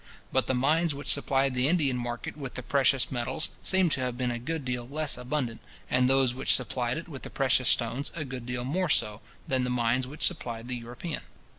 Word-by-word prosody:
But 130 - +2
the 130 - +1
mines 155 +4 +2
which 145 - -4
supplied 135 -1 +2
the 125 +1 +2
Indian 150 -6 +2
market 120 -1 -4
with 135 -4 -7
the 130 - -4
precious 135 0 +2
metals 120 +4 -1
seem 190 -1 +3
to - - +1
have 125 -1 -2
been 125 -1 0
a 120 - -3
good 150 +3 -4
deal 125 -1 -3
less 150 +2 +1
abundant, 125 -2 -3 0.3
and 125 0 +4
those 135 -2 +4
which 130 - +3
supplied 125 0 -2
it 165 - -6
with 140 -6 -8
the - - -8
precious 130 -2 +2
stones 120 +4 +1
a 155 -3 -3
good 125 -2 -7
deal 125 0 -2
more 175 +7 0
so, 105 -5 +1 0.3
than 130 -1 +1
the 125 - -1
mines 125 +1 +1
which 150 +4 -2
supplied 120 -9 -2
the 125 - 0
European. 120 +7 -5
130 Hz, 215 wpm, -28 LUFS, 125-145 Hz, 0.3 s, and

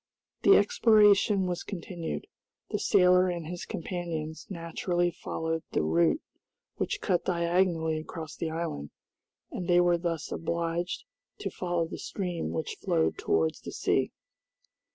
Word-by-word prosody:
The - - +7
exploration 210 - +5
was 180 -1 -2
continued. 175 -3 -5 0.5
The - - 0
sailor 180 0 +5
and 170 -2 -3
his 175 +2 -5
companions 165 -4 -4
naturally 175 0 -1
followed 160 0 -3
the - - +2
route 80 +2 +2 0.5
which - - -2
cut 180 -2 +1
diagonally 170 -2 +1
across 160 0 -7
the 165 - -3
island, 160 - -4 0.6
and 180 - -4
they 175 -1 +5
were 175 -1 +4
thus 165 -2 -3
obliged 170 +1 -2 0.3
to 415 - -4
follow 175 -2 -1
the - - -7
stream 175 - -3
which 80 0 -3
flowed 80 0 +1
towards 80 -1 +1
the - - -7
sea. - - +1
170 Hz, 130 wpm, -29 LUFS, 160-180 Hz, 0.6 s, The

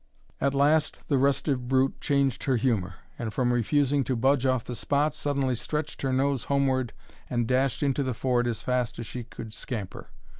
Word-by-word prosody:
At 140 0 +1
last 150 +2 +3
the 140 -3 +3
restive 135 -1 +1
brute 130 +1 +1
changed 140 -3 +1
her 135 - +2
humour; 105 -7 0 0.2
and, 115 -2 -3
from 125 +3 +1
refusing 140 +4 +2
to 130 - 0
budge 135 +2 +2
off 130 -3 +1
the 125 - -6
spot, 145 +4 +1
suddenly 140 -3 0
stretched 150 +5 -3
her 135 - 0
nose 135 -1 +1
homeward, 135 -3 +1 0.4
and 120 -2 0
dashed 130 +2 +1
into 140 0 +1
the 130 -3 -1
ford 120 0 +1
as 115 -3 -3
fast 125 -2 -1
as 115 - -5
she 125 +2 -6
could 115 -2 -9
scamper. 110 -5 -6
130 Hz, 185 wpm, -27 LUFS, 120-140 Hz, 0.4 s, last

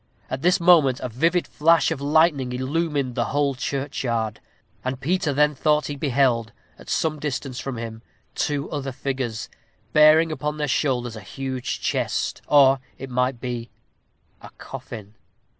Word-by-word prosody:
At 130 +1 -3
this 180 +4 +3
moment 165 -7 +5
a 125 - -3
vivid 165 +9 +1
flash 165 +2 +3
of 150 -4 -3
lightning 145 -3 +2
illumined 140 0 -1
the 120 0 0
whole 145 -1 +1
churchyard, 125 -4 -2 0.4
and 130 0 -3
Peter 160 +2 0
then 150 +2 +3
thought 150 +2 +2
he 145 - -4
beheld, 130 -5 +1 0.3
at - - -13
some 155 -2 0
distance 135 -3 -4
from 135 -3 -5
him, 115 -1 -6 0.3
two 145 0 -1
other 140 -3 -3
figures, 125 -5 -3 0.5
bearing 155 +2 +6
upon 150 0 -3
their 150 -1 -1
shoulders 125 -4 0
a 110 - -8
huge 130 +5 -4
chest, - - -1
or, 135 -2 +6 0.2
it 135 0 -8
might 125 0 0
be, 120 -2 -5 0.7
a - - -11
coffin. 105 -3 -9
135 Hz, 150 wpm, -23 LUFS, 125-150 Hz, 0.7 s, bearing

